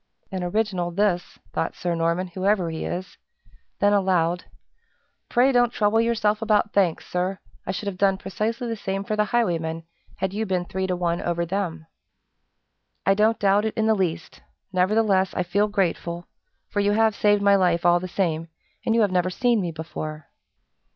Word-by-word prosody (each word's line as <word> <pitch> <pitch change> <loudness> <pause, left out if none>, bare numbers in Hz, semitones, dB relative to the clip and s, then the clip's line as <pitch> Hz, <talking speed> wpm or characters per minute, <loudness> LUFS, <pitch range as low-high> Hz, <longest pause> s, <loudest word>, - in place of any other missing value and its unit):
"An 185 -1 -3
original, 185 -2 0
this," 180 -1 0 0.2
thought - - -2
Sir 175 -1 -2
Norman, 170 +2 0
"whoever 185 -1 0
he 160 - -4
is." 180 +2 -5 0.6
Then 205 0 +4
aloud: 180 -3 +1 0.8
"Pray 250 +3 +4
don't 245 -2 +3
trouble 220 0 +2
yourself 225 -2 +1
about 215 -1 +2
thanks, 185 -5 +2
sir, 180 +2 -1 0.3
I - - 0
should 205 - -5
have 195 -2 -4
dome 195 -1 +3
precisely 225 +5 -3
the 230 - -2
same 195 -2 -3
for 215 - -2
the 210 0 +2
highwaymen, 165 -9 0 0.3
had 190 0 -2
you 220 +1 -2
been 180 -2 0
three 190 +1 -3
to 180 - 0
one 175 -1 -1
over 170 0 -1
them." 170 -3 -3 1.2
"I 195 - +5
don't 215 +3 +3
doubt 200 +1 +3
it 220 - -3
in 220 - +2
the 220 - +4
least; 175 -5 -2 0.3
nevertheless 190 0 +2
I 180 - +1
feel 200 +4 +1
grateful, 175 -4 -2 0.4
for 205 - -2
you 205 0 +2
have 220 0 +3
saved 205 0 +3
my 200 0 +6
life 175 -3 +2
all 175 0 +5
the 185 - -5
same, 165 -3 -1 0.4
and 225 - +1
you 230 - +4
have 205 -3 +2
never 180 0 +1
seen 235 +3 +1
me 175 -2 -2
before." 155 -1 -7
190 Hz, 180 wpm, -24 LUFS, 175-210 Hz, 1.2 s, my